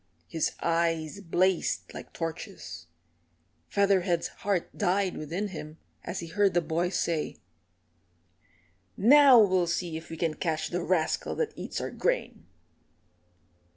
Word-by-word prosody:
His 160 Hz, +6 st, -1 dB
eyes 165 Hz, 0 st, 0 dB
blazed 185 Hz, 0 st, 0 dB
like -, -, -9 dB
torches. 160 Hz, -, -6 dB, 0.8 s
Featherhead's 190 Hz, -4 st, +2 dB
heart 195 Hz, -4 st, -1 dB
died 195 Hz, -1 st, +1 dB
within 175 Hz, +7 st, -3 dB
him 155 Hz, -3 st, -8 dB, 0.3 s
as 180 Hz, -, -4 dB
he -, -, -5 dB
heard 200 Hz, +1 st, +2 dB
the -, -, +6 dB
boys 170 Hz, +3 st, -1 dB
say, 165 Hz, -3 st, -1 dB, 1.6 s
"Now 275 Hz, +4 st, +8 dB
we'll 185 Hz, -5 st, +4 dB
see 170 Hz, -1 st, -2 dB
if 160 Hz, -, -10 dB
we 165 Hz, -, -7 dB
can 165 Hz, -1 st, 0 dB
catch 155 Hz, 0 st, -2 dB
the 180 Hz, -, -2 dB
rascal 170 Hz, -3 st, 0 dB
that 450 Hz, -2 st, -1 dB
eats -, -, -5 dB
our -, -, -4 dB
grain." -, -, -2 dB
175 Hz, 125 wpm, -28 LUFS, 165-195 Hz, 1.6 s, Now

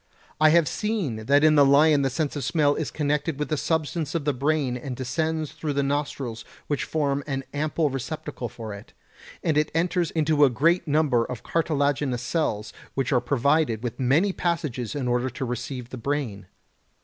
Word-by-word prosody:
I 155 Hz, 0 st, +6 dB
have 165 Hz, -1 st, +4 dB
seen 155 Hz, -, -2 dB
that 145 Hz, +2 st, +5 dB
in 155 Hz, -1 st, +6 dB
the 145 Hz, -2 st, +6 dB
lion 145 Hz, +2 st, +5 dB
the 135 Hz, -, +1 dB
sense 145 Hz, +3 st, -2 dB
of 145 Hz, -, -3 dB
smell 145 Hz, +3 st, +2 dB
is 155 Hz, -, -3 dB
connected 150 Hz, 0 st, -1 dB
with 150 Hz, -2 st, -3 dB
the 155 Hz, -, +1 dB
substance 155 Hz, 0 st, -1 dB
of 160 Hz, -4 st, -1 dB
the 145 Hz, -, +2 dB
brain 140 Hz, -1 st, 0 dB
and 125 Hz, +1 st, -5 dB
descends 155 Hz, +4 st, -2 dB
through 155 Hz, -1 st, -4 dB
the 140 Hz, 0 st, +1 dB
nostrils 135 Hz, -5 st, -2 dB, 0.2 s
which 145 Hz, -, -1 dB
form 140 Hz, -2 st, 0 dB
an 135 Hz, -2 st, -2 dB
ample 150 Hz, 0 st, 0 dB
receptacle 135 Hz, -1 st, -5 dB
for 110 Hz, -2 st, -7 dB
it; 100 Hz, -, -11 dB, 0.5 s
and 155 Hz, -3 st, +2 dB
it 150 Hz, -, 0 dB
enters 170 Hz, 0 st, +1 dB
into 155 Hz, -2 st, +2 dB
a 140 Hz, -, +7 dB
great 165 Hz, +8 st, +2 dB
number 145 Hz, -5 st, +3 dB
of 120 Hz, 0 st, -6 dB
cartilaginous 145 Hz, -5 st, 0 dB
cells 110 Hz, -7 st, -1 dB, 0.2 s
which 135 Hz, 0 st, -1 dB
are 125 Hz, -, +3 dB
provided 135 Hz, -1 st, +1 dB
with 120 Hz, +1 st, -4 dB
many 150 Hz, +10 st, +3 dB
passages 150 Hz, -, -2 dB
in 135 Hz, -3 st, -2 dB
order 125 Hz, +1 st, +1 dB
to 130 Hz, +2 st, -5 dB
receive 125 Hz, 0 st, -5 dB
the 130 Hz, -, -6 dB
brain. 115 Hz, -8 st, -3 dB
145 Hz, 185 wpm, -25 LUFS, 125-155 Hz, 0.5 s, a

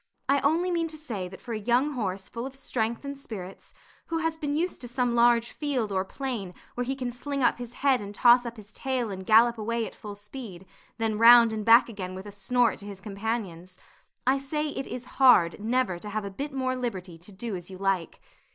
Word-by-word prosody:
I 280 Hz, +1 st, +4 dB
only 325 Hz, +6 st, +1 dB
mean 335 Hz, -1 st, 0 dB
to 315 Hz, -1 st, -8 dB
say 225 Hz, -12 st, -5 dB
that 190 Hz, +1 st, -11 dB
for 235 Hz, -, -6 dB
a 215 Hz, -, -2 dB
young 245 Hz, +7 st, +2 dB
horse 195 Hz, -7 st, -3 dB
full 235 Hz, +5 st, -5 dB
of 270 Hz, -, -11 dB
strength 235 Hz, -2 st, -2 dB
and 280 Hz, 0 st, -4 dB
spirits, 200 Hz, -9 st, -9 dB, 0.3 s
who 330 Hz, -, -1 dB
has 325 Hz, 0 st, -1 dB
been 295 Hz, -2 st, -2 dB
used 345 Hz, +4 st, -1 dB
to 245 Hz, -, -5 dB
some 245 Hz, 0 st, 0 dB
large 235 Hz, 0 st, +4 dB
field 260 Hz, -8 st, -2 dB
or 190 Hz, -1 st, +1 dB
plain 215 Hz, -4 st, -5 dB, 0.2 s
where 245 Hz, -, -2 dB
he 265 Hz, +2 st, -2 dB
can 250 Hz, -2 st, -3 dB
fling 275 Hz, +2 st, -3 dB
up -, -, +3 dB
his 240 Hz, -1 st, -7 dB
head 265 Hz, -4 st, +4 dB
and 205 Hz, 0 st, -8 dB
toss 245 Hz, +2 st, +6 dB
up 235 Hz, -1 st, -7 dB
his 210 Hz, 0 st, -12 dB
tail 255 Hz, -3 st, -2 dB
and 190 Hz, -1 st, -7 dB
gallop 230 Hz, +1 st, +5 dB
away 230 Hz, +1 st, -1 dB
at -, -, -8 dB
full 205 Hz, -1 st, -9 dB
speed, 205 Hz, -3 st, -9 dB, 0.3 s
then 220 Hz, -2 st, -1 dB
round 230 Hz, 0 st, +8 dB
and 215 Hz, -1 st, -3 dB
back 230 Hz, +2 st, +7 dB
again 190 Hz, -5 st, -6 dB
with 190 Hz, +1 st, -8 dB
a 205 Hz, -, -8 dB
snort 230 Hz, +4 st, +1 dB
to 205 Hz, -, -9 dB
his 200 Hz, -2 st, -8 dB
companions 195 Hz, -4 st, -4 dB, 0.5 s
I 265 Hz, +2 st, +3 dB
say 300 Hz, +3 st, -2 dB
it 270 Hz, -2 st, -5 dB
is 250 Hz, 0 st, -6 dB, 0.2 s
hard 195 Hz, -11 st, +6 dB
never 225 Hz, -5 st, 0 dB
to 210 Hz, -, -7 dB
have 215 Hz, 0 st, -3 dB
a 200 Hz, -, -5 dB
bit 280 Hz, +9 st, -5 dB
more 260 Hz, -1 st, -1 dB
liberty 190 Hz, -9 st, -5 dB
to 180 Hz, +5 st, -12 dB
do 205 Hz, +2 st, -5 dB
as 175 Hz, 0 st, -7 dB
you 190 Hz, -, -9 dB
like. 195 Hz, -3 st, -1 dB
235 Hz, 230 wpm, -27 LUFS, 200-260 Hz, 0.5 s, round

